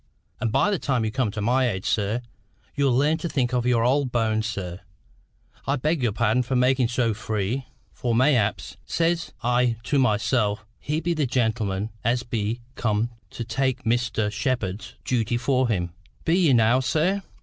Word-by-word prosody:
And 115 - -1
by 205 - +3
the 195 - 0
time 125 -5 0
you 110 - -1
come 125 -1 0
to 105 +1 -4
my 125 +3 +3
age, 95 -2 -4
sir, 105 +3 0 0.5
you'll 140 -2 +2
learn 150 +4 +2
to 170 - -3
think 130 -5 0
of 125 -1 +1
your 120 -2 +3
old 130 +1 +2
bones, 110 -2 +1
sir. 95 -5 -5 0.9
I 140 - +2
beg 150 +3 0
your 120 -3 +2
pardon 110 +4 +2
for 125 +2 -2
making 125 0 +3
so 120 -1 +1
free. 110 +4 -2 0.3
For 120 -2 -1
mayhap, 125 -4 +3 0.3
says 170 0 0
I 125 0 +2
to 145 +2 +1
myself, 110 -2 +1
he 155 +2 -2
be 170 +1 0
the 155 -4 0
gentleman 110 -4 0
as 120 +2 +1
be 115 0 -2
come 110 0 0 0.2
to 120 - -6
take 130 +1 -1
Mr. 115 -2 0
Shepherd's 105 -4 -2
duty 120 -1 0
for 130 +1 +1
him. 90 -6 -1 0.3
Be 165 - +3
ye 170 -7 +4
now, 120 +2 +4
sir?" 160 +9 +1
120 Hz, 175 wpm, -24 LUFS, 110-130 Hz, 0.9 s, ye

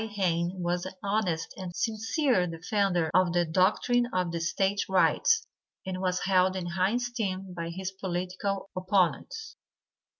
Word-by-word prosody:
Hayne 180 -2 0
was 175 +1 -1
an 185 - -9
honest 195 -5 -1
and 180 -3 -6
sincere 225 - +1
defender 175 0 0
of 185 -2 +4
the 175 -1 +3
doctrine 210 +8 +2
of 180 -2 0
the 170 - -2
State 195 +4 0
Rights, 450 - +3 0.4
and 185 -1 -4
was 180 -1 0
held 185 0 +3
in 185 -2 -3
high 185 +5 +1
esteem 210 -7 -3
by 170 -1 -4
his 185 +2 -4
political 190 +1 -3
opponents. 185 - 0
185 Hz, 140 wpm, -28 LUFS, 175-200 Hz, 0.4 s, of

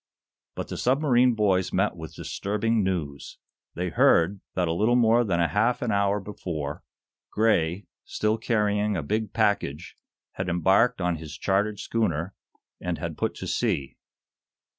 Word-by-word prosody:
But - - -5
the - - -5
submarine 125 -2 +3
boys 95 -4 +1
met 95 +1 +1
with 80 -2 -9
disturbing 105 +2 -1
news. 80 -7 -3 0.4
They 90 +1 -2
heard 90 +4 +3
that 90 -2 +1
a 80 - 0
little 110 +8 +2
more 120 0 +4
than 95 -6 0
a 85 - +3
half 115 +5 +1
an 120 - 0
hour 100 0 +2
before, 85 -8 -5 0.5
Gray, 100 -4 +1 0.2
still 110 +1 -1
carrying 105 -3 +1
a 80 - -3
big 110 +6 -2
package, 100 -9 -1 0.4
had 95 -1 -4
embarked 95 +6 +3
on 90 -1 0
his 80 -1 -9
chartered 100 +2 0
schooner, 95 -6 -1 0.5
and - - -3
had - - -5
put - - -2
to - - -6
sea. 70 -1 -1
100 Hz, 150 wpm, -26 LUFS, 85-110 Hz, 0.5 s, more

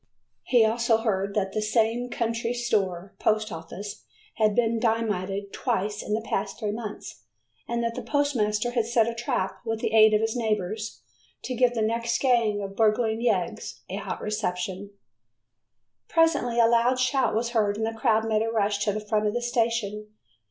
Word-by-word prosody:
He 240 -3 +4
also 230 +1 +2
heard 200 -3 -1
that 195 -2 0
the 215 - 0
same 225 +3 +1
country 230 0 -2
store 195 -6 -1
post 215 -1 +1
office 180 +5 -7 0.3
had 215 -2 +3
been 230 -1 +2
dynamited 205 -4 -1
twice 205 +2 -1
in 210 - -1
the 225 - -2
past 195 0 -2
three 210 -3 -2
months, 215 - -7 0.4
and 235 0 -1
that 230 0 -1
the - - -5
postmaster 240 -6 0
had 235 -2 0
set 230 -1 +3
a 235 - -1
trap 190 -5 -2
with 225 -1 -2
the 220 - -2
aid 220 -1 +7
of 210 - +2
his 225 +1 -1
neighbors, 215 -1 -2 0.4
to 255 - -3
give 245 0 +2
the 225 - +1
next 230 +1 0
gang 230 -6 +2
of 195 0 -6
burgling 220 +1 +2
yeggs 200 -8 -1
a - - -3
hot - - -5
reception. 190 -1 -3 1.2
Presently 300 -8 +2
a 230 - +7
loud 235 +2 +3
shout 255 -2 +2
was 235 +2 0
heard 210 -4 +1
and 220 - -1
the 225 - -2
crowd 225 -1 +2
made 215 -1 +2
a 225 - 0
rush 205 -2 0
to 210 - +2
the 210 +1 -5
front 210 0 +1
of 210 - -1
the 240 - 0
station. 230 -3 -1
220 Hz, 180 wpm, -26 LUFS, 210-235 Hz, 1.2 s, aid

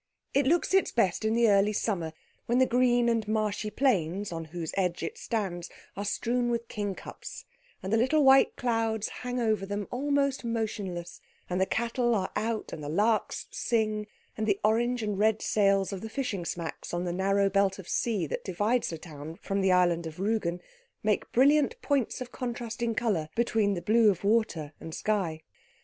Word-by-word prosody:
It 275 0 +3
looks 345 +5 +2
its 385 - +3
best 200 -4 +1
in 220 +1 +1
the 235 0 +4
early 205 0 +4
summer, 185 -7 -1 0.4
when 240 - +2
the 260 - +5
green 245 -1 +3
and 230 -2 +1
marshy 215 -1 -1
plains 205 - 0
on 165 -1 -4
whose 160 0 -5
edge 180 -3 0
it 430 - -3
stands 195 - -3 0.3
are 200 - -3
strewn 240 +3 0
with 235 -1 -2
kingcups, 205 -3 -6 0.4
and 190 +3 -2
the - - +5
little 260 +6 +3
white 270 0 +6
clouds 225 -3 0
hang 250 0 -2
over 220 -4 +1
them 205 +1 -3
almost 280 +1 0
motionless, 210 -7 -3 0.3
and 180 +1 0
the 190 - +2
cattle 235 0 +1
are 190 -3 -1
out, 225 0 -2
and 150 - -6
the 145 - -4
larks 210 +7 +1
sing, 215 -2 0 0.3
and 215 0 -2
the 200 -2 +2
orange 235 +2 +2
and 205 -2 -2
red 215 0 +3
sails 195 -2 +2
of 190 - -5
the 220 - -6
fishing 220 -8 -3
smacks 170 0 -4
on 175 - -1
the 175 -1 -2
narrow 195 +2 +2
belt 195 0 +2
of 190 -3 -10
sea 215 -8 0
that - - -4
divides 205 +6 0
the 165 - -5
town 155 0 -9
from 195 0 -1
the 190 -1 +3
island 175 -2 +3
of 160 - -8
Rügen 190 -3 -1 0.4
make 210 -1 0
brilliant 295 - +4
points 275 -4 0
of 250 -1 -6
contrasting 235 -2 -3
colour 200 -10 0
between 220 -4 +2
the 175 - -5
blue 220 +3 +5
of 190 -3 -1
water 200 -8 +1
and 160 - -7
sky. 175 -7 -1
215 Hz, 185 wpm, -29 LUFS, 190-235 Hz, 0.4 s, white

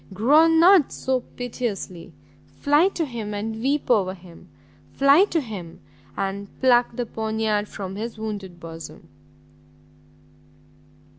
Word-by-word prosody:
groan 310 - +5
not 355 -3 +6
so 260 -1 -1
piteously! 230 -8 -6 0.5
fly 295 +5 +4
to 345 -4 -2
him, 225 -6 -5
and 220 +2 -4
weep 275 +1 0
over 190 -5 +2
him! 175 -2 -16 0.4
fly 280 +7 +5
to 340 - -1
him 195 - -8 0.4
and 195 +1 -3
pluck 245 -2 +3
the 245 - -2
poniard 220 -1 -2
from 195 -2 -7
his 225 +2 -5
wounded 200 -5 -6
bosom!" 165 -1 -10
220 Hz, 120 wpm, -23 LUFS, 200-270 Hz, 0.5 s, not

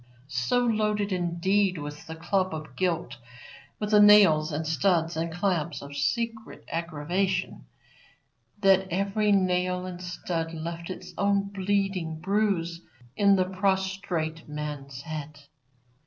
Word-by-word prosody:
So 140 - +1
loaded, 210 -2 +1
indeed, 185 +2 +1
was 145 0 -7
the 160 - -7
club 185 +1 0
of 155 0 -8
Guilt 175 -2 -1 0.6
with 210 0 -3
the 210 - +6
nails 195 -7 +7
and 155 +2 -2
studs 165 0 +1
and 165 +1 -2
clamps 175 -3 -1
of 140 0 -9
secret 225 +9 -2
aggravation, 170 - -2 1.0
that 190 -1 +4
every 200 +3 +1
nail 180 -1 +1
and 180 -1 -7
stud 170 -2 -4
left 170 +2 -5
its 180 -1 -8
own 200 0 +2
bleeding 195 -4 -1
bruise 180 -3 0 0.3
in 200 -1 +5
the 185 -1 +2
prostrate 190 -4 -1
man's 145 -3 -6
head. 155 -2 -7
180 Hz, 125 wpm, -27 LUFS, 160-195 Hz, 1.0 s, nails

